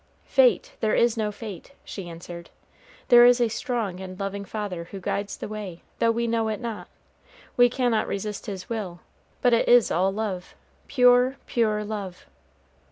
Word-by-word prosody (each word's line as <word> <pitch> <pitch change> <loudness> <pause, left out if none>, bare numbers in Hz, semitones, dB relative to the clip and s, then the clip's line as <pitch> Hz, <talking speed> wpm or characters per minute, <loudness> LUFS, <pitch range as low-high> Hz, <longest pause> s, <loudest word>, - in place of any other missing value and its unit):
"Fate! - - +3
there 220 -2 +1
is 235 -1 +3
no 215 -2 -1
fate," 210 +3 -9
she 185 -4 -7
answered; 170 0 -9 0.6
"there 240 0 +9
is 245 0 +6
a 240 -2 +2
strong 220 -5 -3
and 185 -1 -8
loving 200 0 -3
Father 195 -4 -5
who 195 +3 -9
guides 200 +2 -3
the - - -6
way, 205 -5 -7 0.2
though 230 - +3
we 235 +1 0
know 230 -1 0
it 215 -1 -2
not. 230 -3 -6 0.7
We 245 0 +6
cannot 245 -3 0
resist 210 +2 -4
His 190 -3 -6
will; 195 -7 -5 0.4
but 245 -1 +4
it 230 - +2
is 245 -1 +6
all 185 +3 +2
love, 195 -3 -4 0.3
pure, 250 0 +4
pure 215 -3 0
love." 205 -4 -6
215 Hz, 165 wpm, -25 LUFS, 195-235 Hz, 0.7 s, there